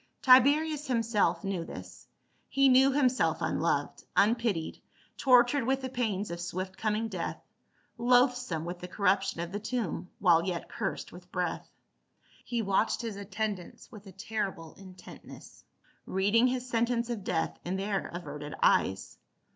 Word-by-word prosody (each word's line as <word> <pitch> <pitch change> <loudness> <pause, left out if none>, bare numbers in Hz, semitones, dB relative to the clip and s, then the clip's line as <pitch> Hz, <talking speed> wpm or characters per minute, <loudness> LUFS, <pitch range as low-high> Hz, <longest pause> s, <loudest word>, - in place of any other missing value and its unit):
Tiberius 290 +3 +5
himself 225 -8 +1
knew 195 -4 -2
this; - - -10 0.4
he 275 0 +4
knew 265 +2 +6
him 275 -1 +3
self 250 +1 0
unloved, - - -1
unpitied, 210 -6 +1 0.3
tortured 250 +1 +4
with 265 +2 0
the 260 - -3
pains 215 -6 -2
of 170 0 -5
swift 185 +2 -4
coming 215 +2 -1
death, 185 -6 -4 0.6
loathsome 245 - +2
with 175 +1 -5
the 180 - -7
corruption 195 -2 0
of 170 0 -5
the 205 - -3
tomb 220 -5 -3
while 170 -3 +4
yet 175 -2 -3
cursed - - -4
with - - -14
breath. - - -3 0.7
He 235 -2 -2
watched 200 +4 +1
his 225 -3 -4
attendants 200 -2 -5
with 210 -2 -12
a - - -10
terrible 190 -4 -4
intentness, 185 -2 -13 0.4
reading 205 +6 +3
his 255 0 -2
sen 235 -1 +1
tence 240 -1 -1
of 220 -5 -4
death 165 -3 -2
in 180 +2 -3
their 195 +1 -2
averted 150 -4 -7
eyes. - - +1
210 Hz, 145 wpm, -29 LUFS, 185-245 Hz, 0.7 s, knew